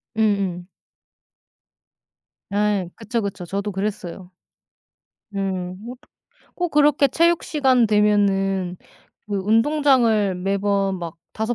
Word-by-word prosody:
음음. 200 -5 0 1.8
네, 205 -2 0
그쵸, 230 +1 -3
그쵸. 200 -3 -5
저도 200 +3 -3
그랬어요. 190 -2 -5 1.0
음, 185 -2 -3
뭐 245 +2 -7
어떻게 - - -29 0.4
꼭 355 -1 -1
그렇게 295 -1 +4
체육 335 +4 +2
시간 265 -5 +3
되면은 195 -3 +1 0.5
그 205 -1 -2
운동장을 225 -1 +3
매번 195 +1 0
막 170 -2 -7 0.2
5 220 +2 -2
205 Hz, 190 characters per minute, -22 LUFS, 195-235 Hz, 1.8 s, 그렇게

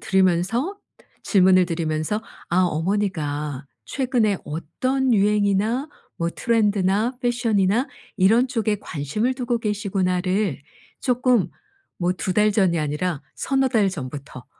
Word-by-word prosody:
들으면서 190 - +1 0.4
질문을 185 -2 +4
드리면서 165 +4 -2 0.3
아 185 +2 +3
어머니가 155 -6 -1 0.2
최근에 245 -7 0
어떤 255 - -1
유행이나 210 +5 +2 0.3
뭐 170 - -1
트렌드나 210 +1 +1
패션이나 235 -1 +1 0.3
이런 225 +7 +4
쪽에 225 -4 0
'관심을 185 - -2
두고 245 -2 -1
계시구나.'를 195 - -1 0.4
조금 245 - +2 0.5
뭐 180 0 +1
2 185 0 -3
달 210 +1 +3
전이 190 -5 +2
아니라 150 +1 -2
서너 270 -1 +1
달 220 -5 +2
전부터 140 -6 -7
200 Hz, 260 characters per minute, -23 LUFS, 175-230 Hz, 0.5 s, 질문을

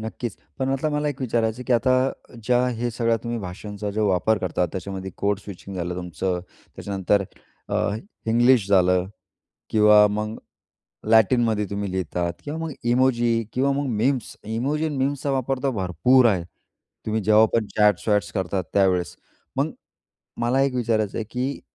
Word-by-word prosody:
नक्कीच. 110 0 -5 0.2
पण 130 0 -1
मतलब 135 +3 0
मला 150 0 0
एक 140 -2 -5
विचारायचं 115 -2 0
आहे, 125 - -7
की 130 - 0
आता 130 +1 +1
ज्या 125 +2 +3
हे 120 0 -2
सगळ्या 115 0 +1
तुम्ही 115 0 -2
भाषांचा 100 +2 -6
जो 105 +1 0
वापर 95 +4 +2
करता, 90 -1 -1
त्याच्यामध्ये 95 0 -5
कोड 100 0 0
स्विचिंग 100 -1 -9
झालं 90 0 -3
तुमचं, 90 +1 -3 0.4
त्याच्यानंतर 100 0 0 0.4
अ, - - -3 0.5
इंग्लिश 120 -1 +4
झालं 90 -1 +3 0.6
किंवा 105 -1 +6
मग 105 +1 -3 0.8
लॅटिनमध्ये 110 -1 +4
तुम्ही 100 -1 -3
लिहितात 90 -1 -2
किंवा 150 +2 -4
मग 165 -1 -3 0.2
इमोजी 120 -2 +2
किंवा 135 +2 +1
मग 140 0 -1
मीम्स 125 +2 0
इमोजी 135 +8 -1
अन् 150 -3 -3
मीम्सचा 140 +1 -1
वापर 135 0 -1
तर 135 - +1
भरपूर 120 +7 +3
आहे. 95 -6 +2 0.6
तुम्ही 110 0 0
जेव्हा 110 +1 +6
पण 115 -2 +2
चॅट्स-वॅट्स 105 0 +2
करतात 95 -1 -2
त्यावेळेस. 95 -3 +2 0.4
मग - - +1 0.7
मला 125 +3 +2
एक 135 -2 0
विचारायचं 110 -4 0
आहे, 110 - -2
की 130 +3 -3
110 Hz, 155 wpm, -23 LUFS, 100-125 Hz, 0.8 s, किंवा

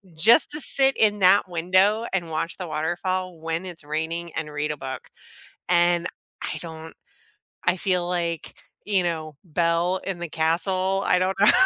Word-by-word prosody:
just 220 - +5
to 300 - 0
sit 270 0 +5
in 210 -1 +3
that 185 0 +4
window 185 +6 +2
and 175 -3 -1
watch 160 +1 -3
the 180 - -6
waterfall 175 +3 -3
when 165 +2 -3
it's 175 -4 -8
raining 160 +3 -3
and 150 -1 -4
read 150 +1 -2
a 150 - -5
book 130 -1 -7 0.6
and 175 -1 +3 0.4
I - - -3
don't 160 -1 -9 0.7
I 175 +2 +2
feel 180 -2 0
like, 170 -2 -3 0.3
you 200 -3 +2
know, 160 -3 -3
Belle 170 +1 0
in 195 -2 -3
the 175 - -4
castle, 185 +5 0
I 180 - +3
don't 185 +1 0
know. 205 - +7
175 Hz, 165 wpm, -24 LUFS, 160-185 Hz, 0.7 s, know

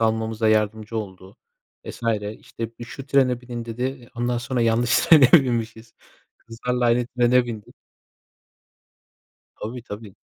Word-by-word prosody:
almamıza 110 0 0
yardımcı 110 +1 0
oldu 95 -2 -7 0.5
vs. - - -9 0.4
İşte, 115 0 -8
"Bir, 120 - -7
şu 135 +3 -9
trene 130 -3 +2
binin." 120 -2 -7
dedi. 115 +1 -6
Eee, 130 -2 -4
ondan 120 0 -1
sonra 125 +1 -2
yanlış 115 +1 +3
trene 145 -6 +6
binmişiz. 115 -6 +2 0.4
Kızlarla 125 +2 -3
aynı 120 0 +2
trene 125 0 +3
bindik. 115 +2 -8 1.8
Tabii, 120 +3 -6
tabii. 105 -2 -9
120 Hz, 130 wpm, -23 LUFS, 110-125 Hz, 1.8 s, trene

